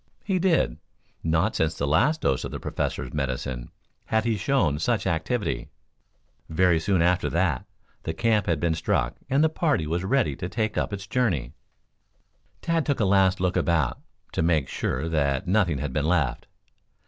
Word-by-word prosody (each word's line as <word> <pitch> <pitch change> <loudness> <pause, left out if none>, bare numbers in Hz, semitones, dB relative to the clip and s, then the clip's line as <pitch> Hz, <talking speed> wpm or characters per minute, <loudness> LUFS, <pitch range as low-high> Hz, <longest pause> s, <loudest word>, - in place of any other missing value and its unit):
He 190 -3 0
did. 175 -2 +2 0.5
Not 80 +6 +1
since 80 0 +1
the 70 - -1
last 115 - +2
dose 65 -2 +1
of - - -4
the - - -6
Professor's - - -3
medicine 65 -3 -3 0.4
had 110 0 +1
he 115 -2 +1
shown 105 - +1
such 110 +2 0
activity. 85 - -1 0.8
Very 90 0 +3
soon 90 +1 +2
after 90 +1 +2
that 85 -6 0 0.3
the 80 - -4
camp 110 0 +2
had 80 -3 +1
been 85 +1 +1
struck 80 - 0
and 140 +3 +3
the - - +6
party 155 - 0
was 85 +4 -1
ready 105 - +1
to 90 - -4
take 110 0 -1
up - - -1
its 100 -1 -5
journey. 95 - 0 1.1
Tad 165 -1 +1
took 145 -2 -1
a 105 - +3
last 95 -1 +3
look 90 0 0
about, 80 -7 +1 0.3
to - - -1
make 80 -4 +2
sure 70 +6 -2
that 70 -4 0
nothing 90 -5 +2
had 65 0 -4
been 75 +1 0
left. 80 -8 0
90 Hz, 170 wpm, -25 LUFS, 75-110 Hz, 1.1 s, the